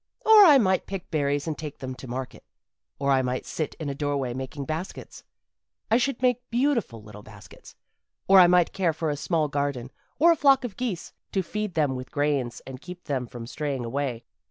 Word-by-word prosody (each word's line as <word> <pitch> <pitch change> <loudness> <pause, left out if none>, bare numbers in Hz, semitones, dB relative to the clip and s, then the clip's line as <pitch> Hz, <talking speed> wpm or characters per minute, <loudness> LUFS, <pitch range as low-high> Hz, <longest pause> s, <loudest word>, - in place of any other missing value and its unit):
Or 435 -2 +9
I 300 -5 +8
might 190 -6 +1
pick 195 -2 -6
berries 145 -2 0
and 160 -2 -2
take 150 -1 -7
them 130 -1 -6
to 130 +1 -10
market. 125 +1 -6 0.5
Or 140 0 0
I 135 -1 +4
might 125 0 -3
sit 155 - -4
in 155 - -6
a 140 - -2
doorway 140 -3 -2
making 130 +2 -6
baskets 160 +5 -6 0.7
I 225 - +6
should 255 0 -1
make 250 0 +1
beautiful 240 - 0
little 105 -1 -12
baskets. 105 -1 -15 0.5
Or 195 0 +8
I 180 - +8
might 180 -1 +3
care 180 -4 +1
for 155 0 -2
a - - -2
small 155 +1 0
garden, 140 -3 -3 0.3
or 335 +4 +6
a - - +4
flock 275 -3 +4
of 230 -6 -5
geese 230 -9 -4 0.2
to 190 - +1
feed 210 +1 -4
them 145 -5 +1
with 130 0 -7
grains 145 -4 -1
and 130 0 -9
keep 180 +1 -10
them 130 -4 -3
from 120 0 -8
straying 135 -1 -4
away. 125 -1 -3
150 Hz, 205 wpm, -26 LUFS, 130-195 Hz, 0.7 s, Or